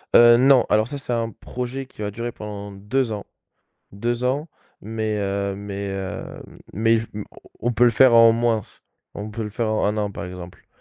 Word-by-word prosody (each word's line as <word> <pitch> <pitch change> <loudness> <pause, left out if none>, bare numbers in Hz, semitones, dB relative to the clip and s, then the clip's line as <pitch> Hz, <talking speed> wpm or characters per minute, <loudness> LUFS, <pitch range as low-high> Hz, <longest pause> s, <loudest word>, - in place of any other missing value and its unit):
Heu, 120 0 +8
non, 135 -1 +6
alors 110 +1 +3
ça, 145 - -5
c'est 135 -3 -4
un 115 -1 0
projet 125 +4 -5
qui 130 - -13
va 105 - -2
durer 115 +3 -4
pendant 105 -2 -7
2 110 +6 -1
ans, 105 -1 -5 0.7
2 120 +4 -2
ans, 140 +6 0 0.3
mais 110 0 -3
heu, 100 0 -1
mais 100 0 -5
heu, 95 -1 -4 0.5
mais 115 +4 +3
il 115 - +2
f 115 - -6
on 105 -1 -5 0.4
on 120 - +3
peut 120 +2 +4
le 120 - +6
faire 125 +1 +6
en 115 0 +8
moins 115 -1 +1
f - - -23 0.3
on 105 +1 -5
peut 115 +1 -4
le 105 - -4
faire 115 +3 -2
en 110 0 0
1 105 +1 0
an, 105 -1 -1
par - - -6
exemple. 90 0 -10
110 Hz, 215 wpm, -23 LUFS, 100-120 Hz, 0.7 s, Heu